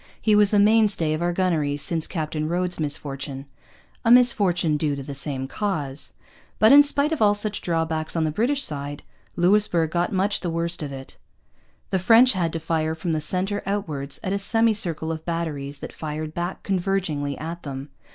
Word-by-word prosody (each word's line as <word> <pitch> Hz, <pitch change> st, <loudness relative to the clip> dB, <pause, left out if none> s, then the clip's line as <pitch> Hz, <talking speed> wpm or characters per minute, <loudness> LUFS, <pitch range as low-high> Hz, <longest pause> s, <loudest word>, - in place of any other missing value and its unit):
He 215 Hz, -, +2 dB
was 210 Hz, -1 st, +5 dB
the 210 Hz, -, +2 dB
mainstay 205 Hz, -6 st, +3 dB
of 155 Hz, -, -3 dB
our 175 Hz, 0 st, +1 dB
gunnery 165 Hz, -6 st, 0 dB
since 160 Hz, +2 st, 0 dB
Captain 155 Hz, -2 st, -3 dB
Rhodes's 180 Hz, 0 st, -1 dB
misfortune' 140 Hz, -2 st, -4 dB, 0.6 s
a 230 Hz, -, +1 dB
misfortune 200 Hz, -10 st, +4 dB
due 150 Hz, -1 st, 0 dB
to 140 Hz, -, -6 dB
the 140 Hz, -, -7 dB
same 135 Hz, -1 st, -1 dB
cause. 150 Hz, -7 st, -3 dB, 0.5 s
But, 220 Hz, -, +5 dB
in 285 Hz, +1 st, +10 dB
spite 290 Hz, +1 st, +2 dB
of 315 Hz, -, -2 dB
all 205 Hz, -1 st, +4 dB
such 205 Hz, 0 st, -3 dB
drawbacks 165 Hz, -2 st, -2 dB
on 165 Hz, -, +1 dB
the 155 Hz, -, 0 dB
British 265 Hz, -, 0 dB
side, 145 Hz, -1 st, -4 dB, 0.3 s
Louisbourg 175 Hz, -3 st, +2 dB
got 175 Hz, 0 st, 0 dB
much 195 Hz, +2 st, 0 dB
the 175 Hz, -, -3 dB
worst 170 Hz, +1 st, -1 dB
of 145 Hz, -2 st, -5 dB
it. 135 Hz, -1 st, -10 dB, 0.7 s
The 190 Hz, -, +1 dB
French 230 Hz, +6 st, +6 dB
had 170 Hz, -4 st, -1 dB
to 165 Hz, -, -2 dB
fire 160 Hz, 0 st, -1 dB
from 165 Hz, +1 st, -3 dB
the 155 Hz, -1 st, -1 dB
centre 190 Hz, +6 st, 0 dB
outwards, 150 Hz, -9 st, -3 dB
at 190 Hz, -, -2 dB
a 200 Hz, -, -1 dB
semicircle 200 Hz, -7 st, +1 dB
of 160 Hz, -1 st, -5 dB
batteries 155 Hz, -5 st, -4 dB
that -, -, -7 dB
fired 155 Hz, 0 st, -5 dB
back 175 Hz, +2 st, -4 dB
convergingly 175 Hz, -7 st, -1 dB
at 165 Hz, +3 st, -6 dB
them. 140 Hz, -1 st, -7 dB
170 Hz, 185 wpm, -23 LUFS, 150-200 Hz, 0.7 s, in